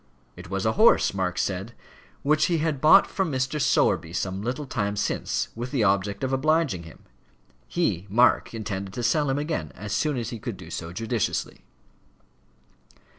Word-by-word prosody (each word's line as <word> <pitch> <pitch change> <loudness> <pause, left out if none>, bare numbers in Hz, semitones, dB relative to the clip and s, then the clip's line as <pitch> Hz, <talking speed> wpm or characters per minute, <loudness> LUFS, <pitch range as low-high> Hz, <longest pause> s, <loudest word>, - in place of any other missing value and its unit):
It 90 0 -11
was 95 +1 -2
a 110 - +3
horse, 220 - +4
Mark 90 -2 -2
said, 100 +4 -2 0.5
"which 150 +2 +3
he 170 - +1
had 155 -3 -1
bought 190 +6 +7
from 190 -5 -2
Mr. 130 +3 -1
Sowerby 80 -10 +2
some 95 +1 -2
little 125 +7 -3
time 105 -6 -2
since - - -1
with 120 +2 -5
the 130 -5 0
object 100 +1 +1
of 130 0 -1
obliging 150 - +1
him. 80 -1 -14 0.6
He, 85 +9 -1
Mark, 120 +5 +3
intended 100 -4 -5
to 120 - -3
sell 145 +4 +2
him 135 - 0
again, 145 - -3
as 105 +1 -6
soon 150 -3 0
as 120 - -3
he 115 - -6
could 110 -2 -5
do 90 - -11
so 85 0 -5
judiciously." 115 +2 -2
115 Hz, 175 wpm, -25 LUFS, 95-145 Hz, 0.6 s, bought